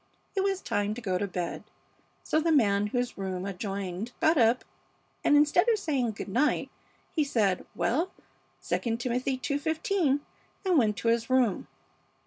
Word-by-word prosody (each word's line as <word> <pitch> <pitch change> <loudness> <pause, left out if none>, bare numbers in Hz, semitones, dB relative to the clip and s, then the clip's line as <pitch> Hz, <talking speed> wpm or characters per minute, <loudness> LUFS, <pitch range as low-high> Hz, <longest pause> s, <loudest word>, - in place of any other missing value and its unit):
It 390 - +2
was 390 -1 0
time 205 +1 -1
to - - -6
go 185 -5 -1
to 200 - -1
bed, 180 -2 -4 0.6
so 310 - +1
the 330 +1 +1
man 205 -8 +3
whose 245 0 -2
room 190 -1 -3
adjoined 195 +2 -4
got 315 +1 +4
up 240 -2 +3 0.6
and, 290 - +5
instead 300 +9 +4
of 450 - +4
saying 270 - -1
good - - -6
night, 255 +10 +1 0.4
he 310 - +1
said, 215 -9 0
'Well, 325 +10 +1 0.6
II 230 -2 0
Timothy 250 +2 -1
ii:15,' 295 +2 0 0.4
and 365 -3 +3
went 210 -4 +1
to 230 - 0
his 230 +1 +1
room. 255 -6 +2
245 Hz, 155 wpm, -28 LUFS, 205-300 Hz, 0.6 s, and